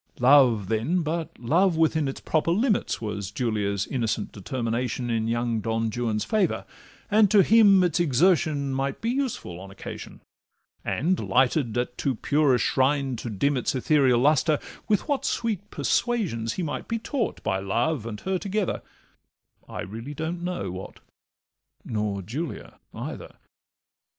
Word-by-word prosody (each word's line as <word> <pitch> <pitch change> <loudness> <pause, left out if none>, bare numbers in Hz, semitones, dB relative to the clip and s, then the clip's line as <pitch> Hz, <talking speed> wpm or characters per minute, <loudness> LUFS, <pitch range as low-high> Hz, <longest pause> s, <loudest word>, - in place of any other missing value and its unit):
Love, 125 -6 +5
then, 120 - 0
but 160 +1 -2
love 165 +8 +2
within 160 -2 +2
its 135 - -4
proper 155 +1 0
limits, 210 +5 +1
Was 105 -3 -4
Julia's 105 -3 -1
innocent 115 -5 -2
determination 120 +3 -2
In 110 -1 0
young 120 0 0
Don 115 +1 -1
Juan's 110 -2 -1
favour, 215 -4 0 0.5
and 210 -1 +5
to 200 -1 +6
him 205 -3 +6
its 175 -1 +1
Exertion 150 -2 +2
might 135 +1 -2
be 230 - -1
useful 250 - -3
on 95 +1 -10
occasion; 95 - -9 0.6
And, 180 +6 0
lighted 125 -2 +2
at 125 0 -2
too 135 -3 0
pure 145 +2 +2
a - - +3
shrine 135 +2 +1
to 115 - -5
dim 140 +8 +1
its 125 +1 -1
Ethereal 130 -2 +3
lustre, 150 +2 +3 0.3
with 210 +6 +1
what 285 -3 0
sweet 225 -6 -2
persuasion 165 - 0
He 175 +11 -2
might 150 -2 -4
be 230 - -1
taught, 235 +1 -3
by 95 - 0
love 115 +6 -1
and 105 -2 -6
her 190 0 -1
together— 200 0 -2 0.9
I - - -5
really 115 +9 -7
don't 160 +3 -3
know 180 - -3
what, 95 +1 -8 0.9
nor 105 -3 -2
Julia 140 - -6
either. - - -7
135 Hz, 150 wpm, -25 LUFS, 115-175 Hz, 0.9 s, to